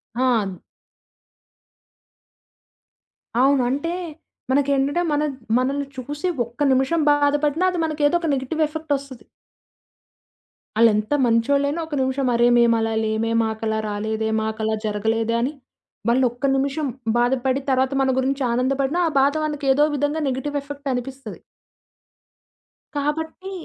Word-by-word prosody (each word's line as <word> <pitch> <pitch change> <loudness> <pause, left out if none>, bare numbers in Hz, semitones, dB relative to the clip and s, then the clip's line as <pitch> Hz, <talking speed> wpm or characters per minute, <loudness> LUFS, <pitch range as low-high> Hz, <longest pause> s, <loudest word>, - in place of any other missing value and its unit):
ఆ! 230 -7 0 2.8
అవును. 270 0 +4
అంటే 285 +5 -1 0.6
మనకేంటంటే, 280 +3 +2
మన 295 +1 +1 0.4
మనల్ని 275 +2 -1
చూసి 290 +6 -5 0.2
ఒక్క 235 +5 -17
నిమిషం 270 +6 +2
బాధపడినా 290 +3 +2
అది 360 - -4
మనకేదో 305 0 +1
ఒక 330 - -3
నెగెటివ్ 275 +4 -2
ఎఫెక్ట్ 315 -1 -4
ఒస్తది. 265 -5 -11 1.6
ఆళేంత 215 +2 +3
మంచోళ్ళయినా 280 +7 +2
ఒక 310 - -6
నిమిషం 265 +1 0
అరే! 240 +1 +4
మేమలా 230 -1 +3
లేమే, 220 +1 -1
మాకు 220 0 -3
అలా 220 0 0
రాలేదే, 220 +1 -2
మాకలా 220 0 -2
జరగలేదే 220 +2 0
అని 255 +5 -1 0.6
వాళ్ళు 255 +2 +3
ఒక్క 245 +3 -12
నిమిషం 280 +2 -1 0.3
బాధపడి 260 +2 +1
తర్వాత 260 +1 +2
మన 265 - +2
గురించి 270 +1 0
ఆనందపడిన 270 +6 0
ఆ - - -3
బాధ 280 +2 +3
మనకు 295 -2 -4
ఏదో 295 +2 +4
విధంగా 290 +3 -1
నెగెటివ్ 280 +3 -3
ఎఫెక్ట్ 285 0 -7
అనిపిస్తది. 260 +2 -6 1.6
కాబట్టి 320 +6 -3
270 Hz, 115 wpm, -22 LUFS, 235-290 Hz, 2.8 s, అవును